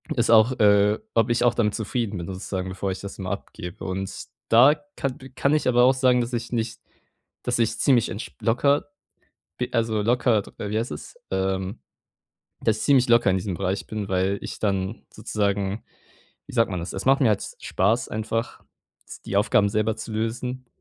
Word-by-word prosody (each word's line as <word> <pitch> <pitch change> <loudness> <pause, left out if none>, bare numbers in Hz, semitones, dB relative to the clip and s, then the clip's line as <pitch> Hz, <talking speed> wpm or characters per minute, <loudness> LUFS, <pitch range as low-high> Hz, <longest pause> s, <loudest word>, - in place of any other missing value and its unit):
es 120 -2 +1
auch, 115 +2 +6
äh 105 0 +4 0.2
ob 115 +1 +3
ich 120 +1 +2
auch 120 -1 +4
damit 105 -3 +1
zufrieden 110 -2 -2
bin 85 - -5
sozusagen, 95 0 -4
bevor 95 +1 -3
ich 95 - -5
das 100 0 -8
immer 95 -2 -4
abgebe. 90 0 -7
Und 95 +1 -3 0.4
da 125 +6 +7 0.2
kann 135 -2 -3 0.2
kann 140 +2 +2
ich 150 - +1
aber 125 -1 +5
auch 130 +1 +6
sagen, 125 -2 +3
dass 120 +1 -4
ich 120 +1 -3
nicht 115 -1 -2 0.6
dass 120 -1 -1
ich 110 -1 +1
ziemlich 125 -6 +3
entsp 105 +5 -7
locker 140 +5 +2 0.7
b 125 - -2
also, 110 -3 +1
locker 120 -2 +2 0.2
wie 105 +1 -2
heißt 115 - -2
es, - - -9
ähm 95 +2 -2 0.8
das 110 -1 +2
ich - - -4
ziemlich 130 -4 +4
locker 120 -4 +5
in 95 - +2
diesem 95 -1 -4
Bereich 95 +1 -2
bin, 105 -2 -4
weil 95 +1 +1
ich - - -6
dann 100 0 -1
sozusagen, 100 0 -2 0.6
wie - - -11
sagt 115 -3 +3
man 90 -2 -3
das? 85 - -6
Es 95 - -4
macht 135 +2 +5
mir 130 - +4
halt 105 -2 +1 0.2
Spaß 110 +6 +1
einfach, 115 +2 -3 0.6
die 100 - -2
Aufgaben 100 0 +3
selber 110 +1 0
zu 110 0 -7
lösen 125 +3 -3
110 Hz, 185 wpm, -24 LUFS, 100-120 Hz, 0.8 s, da